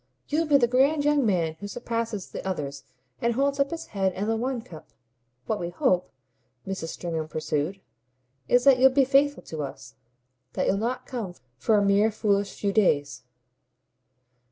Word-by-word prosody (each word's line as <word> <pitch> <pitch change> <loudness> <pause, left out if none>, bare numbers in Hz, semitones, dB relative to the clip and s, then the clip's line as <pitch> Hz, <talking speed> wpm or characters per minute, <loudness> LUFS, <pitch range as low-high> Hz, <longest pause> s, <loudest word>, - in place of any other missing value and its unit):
"You'll 320 +2 +1
be 290 -2 +6
the 250 - +4
grand 280 +4 +3
young 295 -4 +3
man 165 -5 0
who 205 - -6
surpasses 230 -3 -3
the - - -6
others 145 -7 -4 0.4
and 235 0 +1
holds 280 +2 +1
up 280 0 +2
his 330 +1 -5
head 190 -2 +1
and 200 +3 -3
the 225 - +1
wine 245 +1 -2
cup. 160 -7 -12 0.6
What 215 - -1
we 170 - -3
hope," 180 +1 +1 0.6
Mrs. 190 -4 -4
Stringham 165 -2 -4
pursued, 155 +4 -2 0.7
"is 245 0 +4
that 270 -2 +6
you'll 265 +1 +7
be 265 +1 +3
faithful 280 +2 +2
to 160 -2 -6
us 135 -3 -7 0.6
that - - 0
you've 195 - +1
not 240 +4 -2
come 220 -9 -5 0.2
for 215 - +3
a 205 - +3
mere 200 +2 +4
foolish 205 -2 0
few 200 -1 -1
days." 145 -9 +2
210 Hz, 175 wpm, -26 LUFS, 175-255 Hz, 0.7 s, you'll